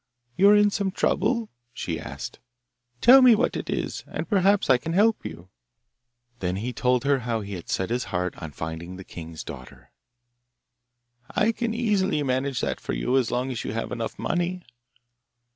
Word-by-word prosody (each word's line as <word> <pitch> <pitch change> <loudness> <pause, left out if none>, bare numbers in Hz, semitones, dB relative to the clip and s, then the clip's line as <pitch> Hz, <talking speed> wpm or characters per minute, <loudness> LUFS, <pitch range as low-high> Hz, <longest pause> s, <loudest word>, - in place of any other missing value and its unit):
'You 200 +2 +6
are 210 - +7
in 205 0 +5
some 200 -2 0
trouble?' 220 +4 0 0.2
she 85 -9 -4
asked. - - -7 0.6
'Tell 265 +2 +9
me 250 -3 +8
what 235 - 0
it - - -5
is, - - -3
and - - -5
perhaps 200 -1 +3
I 130 -2 +5
can 165 +6 -4
help 215 +4 +3
you.' 85 - -8 0.9
Then 90 -1 -1
he 115 +6 -3
told 125 +1 +1
her 140 -1 +2
how 115 -2 -2
he 100 0 -7
had 90 -3 -8
set 95 +4 -1
his 125 +1 0
heart 90 0 -2
on 80 - -5
finding 80 +4 -6
the 95 - -9
king's 80 -3 -8
daughter. 65 0 -11 1.4
'I 215 +2 +3
can 230 0 -2
easily 200 -9 +1
manage 130 0 -1
that - - -2
for - - -4
you - - 0
as 130 -3 +2
long 125 +2 -1
as 120 - -4
you - - -4
have 115 - -3
enough 115 -2 -4
money. 175 +1 -1
130 Hz, 180 wpm, -25 LUFS, -, 1.4 s, Tell